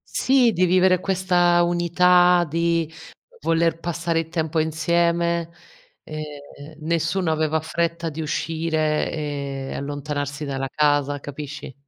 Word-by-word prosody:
Sì, 255 -3 +4
di 180 0 +2
vivere 185 0 +4
questa 180 -2 +2
unità, 175 +1 +4
di 165 +1 0 0.5
voler 165 0 +1
passare 170 -1 -1
il 165 0 -4
tempo 160 -1 -1
insieme. 170 +1 +1 0.5
Ehm, 150 0 -9
nessuno 170 +2 0
aveva 155 0 +1
fretta 170 +1 -2
di 160 +2 -5
uscire 155 0 -1
e 140 -3 -4
allontanarsi 145 +1 -4
dalla 135 -1 -3
casa, 145 0 +1
capisci? 145 -1 -8
160 Hz, 110 wpm, -23 LUFS, 150-170 Hz, 0.5 s, Sì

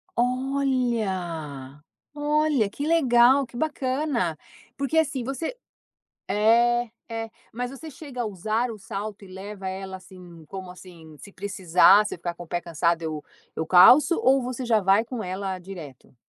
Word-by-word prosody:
Olha. 225 - -1 0.3
Olha, 295 -6 +1
que 285 +8 -5
legal, 265 -4 +4
que 240 - -17
bacana. 260 - -1 0.4
Porque 280 +3 -1
assim 280 -5 +1
você 275 - -4 0.7
É. 235 +3 +3 0.2
É. 225 0 -3 0.2
Mas 245 +2 -4
você 310 +4 -9
chega 265 -3 -7
a - - -1
usar 215 +5 -1
o 220 - -7
salto 200 +1 -6
e - - -13
leva 190 +1 -8
ela, 190 0 -5
assim 180 -3 -14
como 190 -2 -8
assim, 170 -4 -13
se 200 - -13
precisar, 195 +1 +4
você 200 - -5
ficar 170 0 -4
com 175 - -9
o - - -15
pé 175 0 -2
cansado 170 0 0
eu 155 -2 -4 0.3
eu 160 - -2
calço 250 - +7
ou 265 +1 +4
você 255 +1 -4
já 225 -3 +3
vai 195 +3 +3
com 235 -1 -6
ela 190 +1 -4
direto? 170 -10 -11
210 Hz, 155 wpm, -25 LUFS, 180-255 Hz, 0.7 s, calço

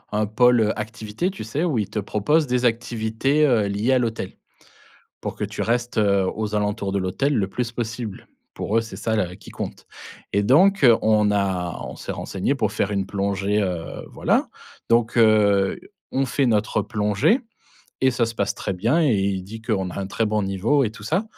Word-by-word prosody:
un 110 - +2
pôle 115 0 +4
activité, 110 - -3
tu 190 - -7
sais, 140 +9 -2
où 160 -8 0
ils 105 - -2
te - - -6
proposent 110 +10 +1
des 125 0 +1
activités, 120 +5 +1
heu, 115 -7 +3
liées 105 +6 +1
à 130 - +4
l'hôtel 115 -2 -3 0.9
pour - - -4
que - - -2
tu - - -4
restes, 120 0 -1
heu, 100 -2 +3
aux 110 -1 -3
alentours 105 -1 -1
de 100 - +1
l'hôtel 100 +10 0
le 100 -4 +1
plus 120 +3 -3
possible. 115 -3 -5 0.3
Pour 110 +3 0
eux - - +3
c'est 115 0 -8
ça 110 -1 -1
la 90 -4 -1
qui - - -13
compte, - - -7 0.5
et 100 +1 +2
donc 180 - +5 0.2
on 105 -1 +3
a 95 -4 -1
on - - -7
s'est - - -5
renseigné 95 +8 -2
pour 110 -7 0
faire 105 -1 -1
une 100 -1 -1
plongée, 100 +1 0
heu 90 -3 -4
voilà - - +1 0.4
donc 115 0 +2
heu, 105 -4 +4 0.3
on 135 - +1
fait 135 +2 +1
notre 110 -2 +1
plongée 105 - +1 0.6
et 130 - +6
ça 120 -2 +1
se 115 - -5
passe 100 -1 0
très - - -3
bien, 115 - +1
et 150 -7 +3
il 95 -2 0
dit 110 +3 -9
qu'on 100 -5 -1
a - - -9
un 95 - -4
très 115 +3 0
bon 105 0 0
niveau 100 +9 +1
et 110 - 0
tout 110 -1 -12
ça, 175 - 0
110 Hz, 200 wpm, -23 LUFS, 100-120 Hz, 0.9 s, et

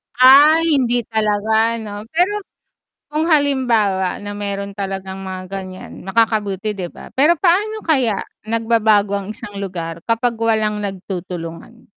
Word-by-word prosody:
Ah, 285 +6 +7
hindi 250 -7 +2
talaga 220 +1 +1
'no, 210 0 -7
pero, 385 +5 +2 0.7
kung 305 +1 -1
halimbawa 245 - +2
na 205 0 -6
meron 200 -1 -4
talagang 195 -1 -5
mga 185 -1 -6
ganyan, 190 -1 -8
makakabuti 210 -1 0
'di 180 -3 -5
ba? - - -12
Pero 300 +5 +4
paano 415 +5 +2
kaya 255 - +1 0.2
nagbabago 220 -2 +2
ang 200 +1 -4
isang 215 -3 -10
lugar 170 -4 -5
kapag 230 +1 0
walang 220 -2 0
nagtutulungan? 185 +1 -6
215 Hz, 125 wpm, -19 LUFS, 195-245 Hz, 0.7 s, Ah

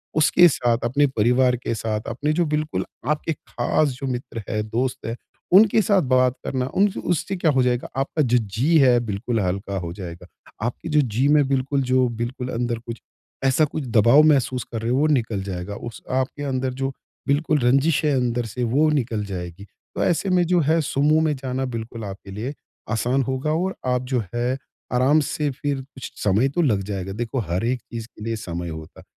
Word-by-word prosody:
उसके 155 +3 +6
साथ, 120 -6 +1
अपने 140 +5 +3
परिवार 125 +3 +3
के - - 0
साथ, 110 -1 -2
अपने 145 +6 -1
जो 170 +2 +2
बिल्कुल 155 0 -2 0.2
आपके 150 +2 0
खास 145 +2 0
जो 135 - -2
मित्र 120 -2 -5
है, 110 -1 0
दोस्त 125 +4 -2
है, 115 - -3 0.4
उनके 215 +3 +7
साथ 200 -1 +3
बात 130 -2 +3
करना, 130 -2 -1
उनसे 200 0 +2
उससे 180 +3 -1
क्या 165 -3 +2
हो 135 -2 +2
जाएगा? 125 -1 0
आपका 135 +3 0
जो 125 -3 +3
जी 120 - +1
है 125 -3 +5
बिल्कुल 115 +1 -2
हल्का 100 +1 -2
हो 85 -2 -5
जाएगा। 85 -3 -8 0.4
आपकी 125 +7 -4
जो 150 -1 +4
जी 125 +1 0
में 145 -1 +4
बिल्कुल 135 +1 +1
जो 130 0 +2
बिल्कुल 120 +2 -4
अंदर 120 0 -1
कुछ 115 0 -6 0.5
ऐसा 135 +4 +4
कुछ 150 +1 -4
दबाव 120 +7 +7
महसूस 130 -3 +2
कर 115 - -3
रहे 115 +1 -1
हो, 125 - +2
वो 150 +3 +3
निकल 115 -9 0
जाएगा, 95 +1 -5
उस 120 +2 -8
आपके 130 +3 -1
अंदर 130 -2 -1
जो 135 0 0 0.4
बिल्कुल 150 +2 +2
रंज़िश 135 +6 +3
है 150 - +3
अंदर 120 -2 0
से 125 +3 -4
वो 140 +7 +3
निकल 120 -8 0
जाएगी। 90 0 -6 0.3
तो - - 0
ऐसे 175 +3 +1
में 180 -1 +3
जो 175 +1 +3
है 160 +1 +2
समूह 150 +2 +2
में 155 -2 +1
जाना 130 0 -3
बिल्कुल 115 0 -7
आपके 100 0 -8
लिए 110 +8 -4 0.4
आसान 125 +4 +1
होगा 130 +3 -1
और 185 +4 -1 0.2
आप 125 - 0
जो 125 -3 +1
है 120 +2 0 0.4
आराम 130 +5 +4
से 150 -1 -1
फ़िर 140 0 -3
कुछ 135 0 -10
समय 105 +7 +3
तो 160 +6 0
लग 110 -11 +2
जाएगा, 95 -1 -4
देखो 120 +4 -3
हर 90 -1 -2
एक 125 0 -1
चीज़ 115 -1 -5
के 110 - -13
लिए 115 +1 -2
समय 85 -4 -5
होता 80 -1 -9
है। - - -14
125 Hz, 200 wpm, -23 LUFS, 115-145 Hz, 0.5 s, उनके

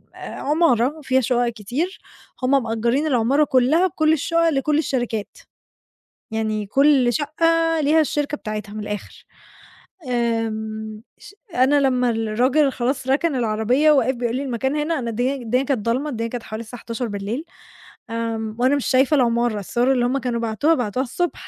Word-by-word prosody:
آآ - - -14 0.2
عمارة 290 -3 +1
وفيها 265 -3 +1
شُقق 245 0 +1
كتير، 245 - -4 0.4
هُم 270 +1 +3
مأجّرين 235 +6 0
العمارة 265 +2 +2
كلّها 295 +6 +3
بكل 315 -2 +2
الشُقق 335 +2 +1
لكل 295 0 +1
الشركات، 240 -8 -2 0.9
يعني 215 -1 -2
كل 270 +2 +3
شقّة 330 +3 +1
ليها 305 +2 +3
الشركة 295 0 -1
بتاعتها 210 -3 -6
من 215 - -6
الآخِر. 210 -1 -7 0.8
آمم 220 -2 -2 0.2
ش 405 - -14 0.2
أنا 265 +3 +4
لمّا 250 -2 +2
الراجل 245 +6 +1
خلاص 255 +1 -2
رَكَن 280 +3 +1
العربية 240 +5 +2
وقف 260 -3 +2
بيقول 240 -1 -2
لي: 270 - -2
"المكان 265 +1 -2
هنا؟" 305 +1 -1
أنا 235 -2 -3
الدنيا 245 +4 -1
الدنيا 250 0 -1
كانت 260 -6 -2
ضلمة، 255 +6 0
الدنيا 230 -4 -3
كانت 240 0 -5
حوالي 220 +1 -6
الساعة 230 +1 -10
23:00، 230 +3 -4 0.6
آمم 225 -1 -3
وأنا 260 +3 +3
مش 285 - -2
شايفة 265 +3 +3
العمارة، 235 -4 +1
الصور 240 +6 0
اللي 245 -2 +1
هم 255 +3 0
كانوا 240 -2 -2
بعتوها، 230 +8 +1
بعتوها 245 0 -1
الصبح، 345 +7 -3
250 Hz, 155 wpm, -21 LUFS, 230-285 Hz, 0.9 s, أنا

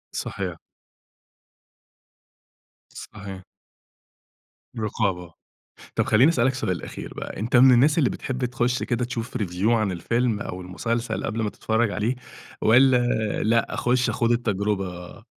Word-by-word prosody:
صحيح. 90 -4 -4 2.3
صحيح. 95 -2 -9 1.4
رقابة، 95 -6 -2 0.6
طب - - +1
خلّيني 125 +8 +5
أسأل 120 -8 +1
لك 130 - +2
سؤال 95 -9 -2
أخير - - -7
بقى، - - -7
أنت 115 +5 -1
من 130 +2 +8
الناس 135 +6 +4
اللي 140 -7 +3
بتحب 130 -1 -3
تخش 120 +1 -1
كده 120 0 -1
تشوف 120 0 -4
review 95 -2 -1
عن 110 -4 +2
الفيلم 115 +5 0
أو 90 -2 -5
المسلسل 115 +6 -3
قبل 115 0 -2
ما 105 - 0
تتفرّج 110 +1 0
عليه، 110 +5 -1 0.5
والّا 130 +3 +6 0.5
لأ 115 +1 +1
أخش 125 0 +1
أخوض 115 +1 +1
التجربة؟ 100 -4 -2
115 Hz, 125 wpm, -24 LUFS, 100-120 Hz, 2.3 s, من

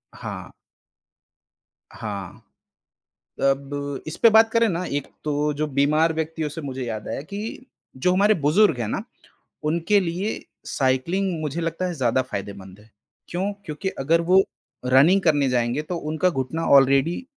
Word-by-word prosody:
हाँ। - - -7 1.4
हाँ। 100 -5 -7 1.0
अब 140 0 -1
इसपे 220 +8 +4
बात 220 +1 +6
करें 230 0 +3
ना, 180 0 -2
एक 145 -4 -3 0.2
तो 150 0 0
जो 155 +1 -1
बीमार 150 +3 +2
व्यक्तियों 160 -1 -2
से 160 +3 -7
मुझे 135 -3 -5
याद 110 -3 -5
आया - - -4
कि, 210 - -7 0.3
जो 180 +8 +2
हमारे 205 +3 +4
बुजुर्ग 170 -1 +4
हैं 110 - -2
ना, - - -2 0.7
उनके 170 +5 +2
लिए 185 +4 -2 0.3
साइक्लिंग 165 +7 0
मुझे 155 +2 -3
लगता 165 +2 -2
है 175 - -3
ज़्यादा 130 -2 +1
फ़ायदेमंद 100 -4 -7
है। 110 - -21 0.4
क्यों? 190 +4 -2
क्योंकि 155 +5 -4
अगर 160 +5 +2
वो 190 +1 +7 0.4
रनिंग 145 +10 +5
करने 145 -5 +3
जाएँगे, 125 +3 0
तो 175 +3 -4
उनका 160 +3 0
घुटना 135 +3 -3
ऑलरेडी 140 - +3
155 Hz, 145 wpm, -23 LUFS, 135-180 Hz, 1.4 s, वो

